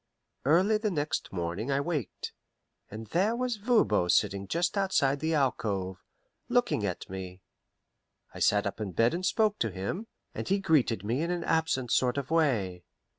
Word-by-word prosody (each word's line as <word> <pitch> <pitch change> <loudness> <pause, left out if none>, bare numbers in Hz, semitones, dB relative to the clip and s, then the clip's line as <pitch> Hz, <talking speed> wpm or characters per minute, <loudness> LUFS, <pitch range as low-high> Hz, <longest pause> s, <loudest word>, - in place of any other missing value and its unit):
Early 185 +9 +4
the 215 -1 0
next 150 -5 -2
morning 90 +6 -3
I 135 0 +2
waked, 145 - -3 0.6
and 110 +2 -7
there 190 - +1
was 250 -2 -1
Voban 200 - +2
sitting 100 +2 +2
just 170 - 0
outside 150 -9 +2
the 160 +1 0
alcove, 100 -9 -1 0.5
looking 245 - +2
at 90 -3 -3
me. 95 -1 -7 0.9
I - - -8
sat 105 0 +3
up 100 +2 -4
in 100 -4 -4
bed 115 - +3
and 175 +2 -3
spoke 215 +2 +2
to 115 - +1
him, 100 - -4 0.3
and - - -5
he 195 - +2
greeted 150 - +2
me 120 +7 0
in 170 - -1
an 175 -1 -1
absent 135 -7 0
sort 125 +1 +2
of 140 +1 -3
way. 110 - +1
140 Hz, 170 wpm, -29 LUFS, -, 0.9 s, Early